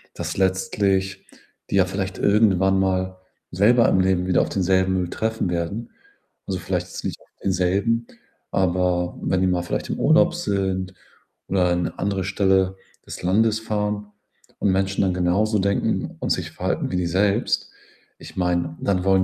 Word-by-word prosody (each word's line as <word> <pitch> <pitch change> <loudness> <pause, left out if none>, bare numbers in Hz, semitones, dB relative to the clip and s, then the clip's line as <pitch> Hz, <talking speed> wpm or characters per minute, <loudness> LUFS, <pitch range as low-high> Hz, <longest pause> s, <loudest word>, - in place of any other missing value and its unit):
dass - - -4
letztlich 95 0 0 0.4
die - - -1
ja 95 -2 +5
vielleicht 95 0 -4
irgendwann 95 -2 +3
mal 95 -1 0 0.3
selber 115 +6 +4
im 95 - +3
Leben 95 -1 +1
wieder 90 - +3
auf - - -1
denselben 95 0 +1
Müll 90 -1 -1
treffen 110 -4 -2
werden. 90 +7 -3 0.6
Also, 95 -2 -2
vielleicht 90 0 -2
jetzt - - -8
nicht - - -4
auf - - -24
denselben, 100 +5 +1 0.4
aber 90 -1 0
wenn 95 - 0
die 95 - +3
mal 90 -1 0
vielleicht 90 - -3
im - - -3
Urlaub 175 +3 +4
sind 95 - -2 0.6
oder 90 -1 +2
an 90 0 +1
'ne - - -5
andere 100 -1 -1
Stelle 95 -1 +2 0.3
des - - -8
Landes 110 +4 +2
fahren 105 -1 -2 0.5
und 100 - +2
Menschen 95 +1 0
dann 95 -1 +1
genauso 95 +4 +1
denken 100 +1 0
und - - -2
sich - - -1
verhalten - - -2
wie 90 - -2
die 90 - 0
selbst. 100 +3 +1 0.5
Ich - - -12
meine, 85 -2 0
dann 95 -2 0
wollen 95 -1 +4
95 Hz, 165 wpm, -23 LUFS, 90-100 Hz, 0.6 s, ja